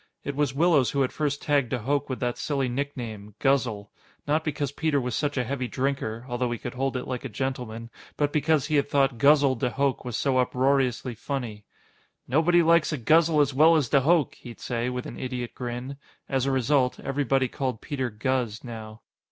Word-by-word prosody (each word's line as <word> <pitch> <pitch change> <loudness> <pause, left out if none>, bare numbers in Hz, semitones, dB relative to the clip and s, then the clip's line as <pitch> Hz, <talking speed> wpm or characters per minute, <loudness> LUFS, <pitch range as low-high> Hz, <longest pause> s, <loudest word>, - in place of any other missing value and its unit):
It 140 - -4
was 145 -2 0
Willows 155 -4 +4
who 140 - 0
had 130 - 0
first 145 -2 -2
tagged 140 -5 +2
de - - -1
Hooch 140 +5 0
with 130 - -3
that 120 -1 -1
silly 140 -3 -1
nickname, 120 -6 -5
"Guzzle". 120 -7 0 0.4
Not 155 +2 +1
because 145 -3 -2
Peter 150 0 0
was 125 -3 -2
such 145 -1 -1
a 125 - +2
heavy 130 +1 -3
drinker 130 -3 -2
although 120 0 -1
he 120 - -2
could 120 - -6
hold 135 0 -1
it 125 - -5
like 125 -1 -4
a 135 - -5
gentleman 120 -1 -4 0.3
but 145 -1 0
because 150 -1 +2
he 150 0 +1
had 140 0 +1
thought 135 -4 +2
"Guzzle" 140 0 +5
de 125 0 -1
Hooch 140 +1 0
was 125 -3 -3
so 135 -2 +1
uproariously 130 -1 +1
funny. 115 -3 -5 0.6
"Nobody 165 +5 +4
likes 170 -1 +4
a 155 - -1
guzzle 155 +4 +4
as 145 -1 +1
well 160 +5 +6
as 145 -6 +1
de 140 - +4
Hooch," 160 +1 +2
he'd 120 -2 -11
say, 120 0 -2
with 125 0 -4
an - - -8
idiot 125 -2 -4
grin. 125 +2 -5 0.3
As 135 -1 0
a - - +2
result, 130 0 +1
everybody 135 -1 0
called 130 -3 -3
Peter 130 -2 -3
"Guz" 115 0 -2
now. 110 -2 -8
135 Hz, 200 wpm, -26 LUFS, 125-145 Hz, 0.6 s, well